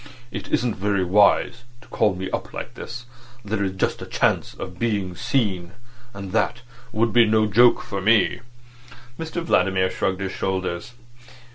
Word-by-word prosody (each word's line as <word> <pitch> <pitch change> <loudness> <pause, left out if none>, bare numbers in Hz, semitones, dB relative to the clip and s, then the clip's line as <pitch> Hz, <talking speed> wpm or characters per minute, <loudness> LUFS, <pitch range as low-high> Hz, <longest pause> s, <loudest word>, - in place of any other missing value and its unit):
It - - -6
isn't 120 -2 +1
very 100 0 +1
wise 105 +5 +3 0.2
to - - -18
call 105 -4 +2
me 95 +1 -4
up - - -4
like - - -6
this. 120 0 -8 0.4
There 100 0 -1
is 95 -1 -1
just 95 - -1
a - - -7
chance - - 0
of 90 -1 -8
being 100 -6 -1
seen. 105 -6 -1 0.4
And 100 -3 -8
that 115 +3 0 0.3
would 115 +1 +1
be 120 -1 +6
no 110 0 +3
joke 120 +4 +5
for 100 -2 -4
me." 105 0 +3 0.8
Mr 165 +1 -4
Vladimir 95 - +2
shrugged 95 -1 -1
his 95 -1 -2
shoulders. 95 +3 -3
105 Hz, 160 wpm, -23 LUFS, 95-115 Hz, 0.8 s, be